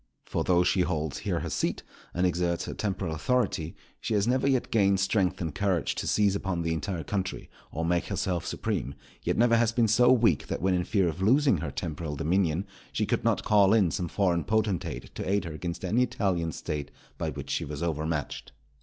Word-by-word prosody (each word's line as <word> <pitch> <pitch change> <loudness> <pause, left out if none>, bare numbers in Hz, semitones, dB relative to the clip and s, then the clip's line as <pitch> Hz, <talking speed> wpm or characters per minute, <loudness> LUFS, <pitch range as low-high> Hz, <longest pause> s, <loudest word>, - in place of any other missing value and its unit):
For - - -2
though 90 -1 +3
she 90 +1 +2
holds 80 -4 -1
here - - -2
her - - -4
seat, - - -1 0.3
and 90 +1 0
exerts 85 -1 0
her - - -5
temporal 95 -5 -2
authority, 90 -2 0 0.2
she 110 - -2
has 105 +1 +2
never 130 +2 +2
yet 130 -3 +1
gained 100 -3 +3
strength 95 -1 +1
and 80 -4 -3
courage 95 -3 0
to - - -4
seize 100 -2 +3
upon 95 -4 -2
the 80 0 0
entire 80 +2 -3
country, 95 -2 -3 0.2
or 80 +2 -2
make 85 +1 +1
herself 90 -3 -2
supreme; 70 - -3 0.3
yet - - -1
never 115 0 +4
has 115 -1 +3
been 115 0 +2
so 120 +3 +5
weak 120 -3 +3
that - - -3
when 95 +1 +1
in 90 -1 0
fear 95 -3 +2
of 85 +2 -3
losing 130 +2 +4
her 75 0 -4
temporal 75 +1 -4
dominion, 85 +3 +1 0.3
she - - 0
could - - -1
not - - +1
call 100 -1 +5
in 95 -7 +3
some 85 +4 -2
foreign 85 -2 +1
potentate 110 -3 -1
to - - -4
aid 100 -1 +1
her 85 - -5
against 85 +3 -5
any 110 +7 +2
Italian 90 -9 0
State 75 -2 -4 0.3
by - - -1
which - - -6
she - - 0
was 75 +3 -5
overmatched. 80 -2 -3
90 Hz, 205 wpm, -28 LUFS, 80-105 Hz, 0.3 s, so